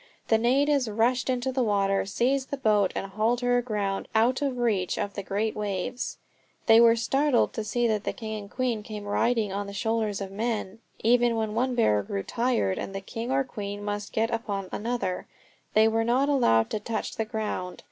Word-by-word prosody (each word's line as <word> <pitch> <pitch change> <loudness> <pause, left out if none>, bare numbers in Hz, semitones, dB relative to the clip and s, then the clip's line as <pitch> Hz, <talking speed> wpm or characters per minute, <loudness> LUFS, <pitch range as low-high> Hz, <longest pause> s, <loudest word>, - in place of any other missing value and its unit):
The 225 - +4
natives 270 +2 +2
rushed 240 +5 +1
into 255 +1 0
the 260 0 0
water, 195 -3 +1
seized 260 +6 0
the 280 - -3
boat 210 -6 +2
and - - -2
hauled 225 +4 +1
her 245 0 +3
aground 210 -5 -2
out 240 +5 +3
of 275 -3 -1
reach 210 -7 0
of 205 -1 -2
the 200 - -4
great 205 +3 -2
waves. 210 +4 -3 0.5
They 225 0 +7
were 230 -1 +7
startled 270 +3 +2
to 220 - -3
see 240 +3 0
the 215 -2 +1
king 220 -1 -5
and 200 - -11
queen 245 -3 -1
come 210 0 -7
riding 210 0 +1
on 200 0 -3
the 200 - -7
shoulders 220 -1 -1
of 195 -1 -5
men. 215 -1 -3 0.2
Even 240 +1 +4
when 220 -1 -1
one 250 +2 0
bearer 105 - +3
grew 100 0 -4
tired 230 - 0
and 195 - -5
the 195 - -3
king 230 +5 -5
or 270 0 +2
the 260 - -20
queen 205 -1 -5
must 205 0 -3
get 225 +1 0
upon 200 -5 -3
another, 225 -5 -2 0.5
they 220 +1 +6
were 225 0 +1
not 255 +5 +2
allowed 115 - +3
to 215 - -1
touch 220 +2 -4
the 225 - 0
ground. 215 -5 -4
220 Hz, 200 wpm, -27 LUFS, 205-245 Hz, 0.5 s, They